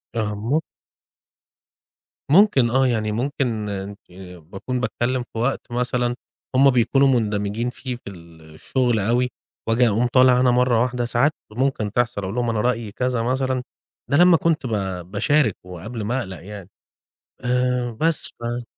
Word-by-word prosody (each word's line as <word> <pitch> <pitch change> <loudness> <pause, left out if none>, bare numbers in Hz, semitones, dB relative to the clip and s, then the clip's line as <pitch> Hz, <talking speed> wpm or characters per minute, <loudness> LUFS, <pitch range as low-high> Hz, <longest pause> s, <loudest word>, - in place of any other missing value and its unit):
آه 105 -2 -1
مم 120 +10 0 1.7
ممكن 150 - +5
آه، 130 +1 +3
يعني 110 -3 0
ممكن 120 -3 -2
آآ 100 0 -5 0.4
باكون 95 +10 -5
باتكلم 125 0 -1
في 115 - -4
وقت 120 0 -2
مثلًا 120 0 -1 0.4
هُم 135 +1 +6
بيكونوا 135 +2 +3
مُندمجين 110 -1 0
فيه 125 0 -6
في 120 - -10
الشغل 85 - -3
أوي 120 +5 +1 0.4
وآجي 120 +2 +3
أقوم 115 +3 +1
طالع 125 0 +5
أنا 125 -1 +4
مرة 125 -2 +3
واحدة 125 -1 -1
ساعات 120 +5 +2 0.2
ممكن 120 -4 -1
تحصل، 120 -3 0
أقول 95 +4 -4
لهُم 120 -1 0
أنا 110 -2 0
رأيي 120 -4 -1
كذا 125 0 -1
مثلًا 130 0 -1 0.4
ده 140 - +2
لمّا 175 -1 +6
كنت 160 -4 0
ب - - -3 0.4
باشارك 115 +1 +2
وقبل 100 +6 -7
ما 120 +5 -1
أقلق 95 -6 -7
يعني 100 -2 -9 0.8
آآ 125 -1 +1
بس 165 -1 +1
ف 120 +1 -5
120 Hz, 145 wpm, -22 LUFS, 105-130 Hz, 1.7 s, هُم